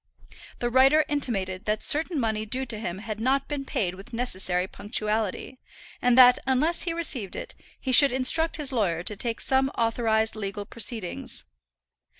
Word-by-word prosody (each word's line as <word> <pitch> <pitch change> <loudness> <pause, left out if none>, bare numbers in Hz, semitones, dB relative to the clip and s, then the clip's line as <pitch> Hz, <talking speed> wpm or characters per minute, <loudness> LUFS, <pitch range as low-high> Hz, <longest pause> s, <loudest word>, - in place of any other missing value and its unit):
The 240 0 -3
writer 270 +5 +4
intimated 210 -10 -2
that 215 0 -2
certain 315 +1 +3
money 220 -3 -1
due 255 +5 -2
to 230 -4 -7
him 175 -4 -5
had 215 +1 -7
not 265 +4 0
been 285 -2 -5
paid 185 -8 -2
with 195 +5 -13
necessary 185 -6 +1
punctuality, 215 +4 -3 0.4
and 245 0 +3
that 250 -1 +7
unless 295 +6 +2
he 345 - -2
received 275 - +1
it, - - -7 0.3
he 260 - -3
should 280 +2 +6
instruct 265 +6 +2
his 295 -3 +2
lawyer 180 -9 -1
to 210 - -3
take 230 +3 -4
some 265 0 +2
authorized 225 -1 0
legal 205 -1 -5
proceedings. 215 - -4
235 Hz, 160 wpm, -25 LUFS, 210-265 Hz, 0.4 s, that